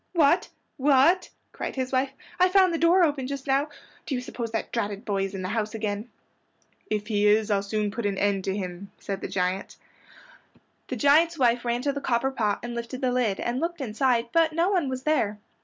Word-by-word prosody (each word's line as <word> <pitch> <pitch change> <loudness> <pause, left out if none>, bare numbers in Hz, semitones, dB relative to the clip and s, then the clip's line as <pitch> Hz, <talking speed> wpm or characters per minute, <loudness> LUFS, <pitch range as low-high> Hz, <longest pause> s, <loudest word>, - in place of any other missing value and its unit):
"What? 330 0 +3 0.3
What?" 290 +7 +4 0.2
cried - - -5
his 260 -1 -2
wife, 265 +1 +1 0.3
"I 365 +1 +5
found 375 -2 +4
the 330 - -1
door 345 +2 +5
open 285 -5 0
just 275 -1 -5
now. 275 +2 +1 0.4
Do 270 - -1
you 250 - -2
suppose 240 -2 -5
that 225 0 -3
dratted 205 -1 -3
boy 195 -2 0
is 195 0 -6
in 185 - -4
the 185 - -3
house 215 0 -2
again?" 210 +1 -3 0.8
"If 210 -1 -1
he 210 -1 +1
is, 210 +1 +3
I'll 200 -1 +2
soon 210 +1 -2
put 225 0 -2
an 200 -1 -2
end 200 -1 +1
to 195 +1 -1
him," 185 0 -6
said 195 -1 -5
the - - -3
giant. 185 +1 -2 1.1
The - - -3
giant's 320 +4 +4
wife 240 -3 +2
ran 240 +1 -1
to 280 -1 0
the 280 - -4
copper 260 +1 +1
pot 215 -6 -1
and 240 0 -5
lifted 235 +2 -5
the 255 -1 +1
lid, 245 -6 0
and 240 +2 -2
looked 340 +2 -2
inside 245 -1 +1
it, 235 - -28
but 330 -1 +3
no 340 +4 +2
one 350 -8 +1
was 260 0 -4
there. 225 -9 +1
240 Hz, 220 wpm, -26 LUFS, 210-280 Hz, 1.1 s, I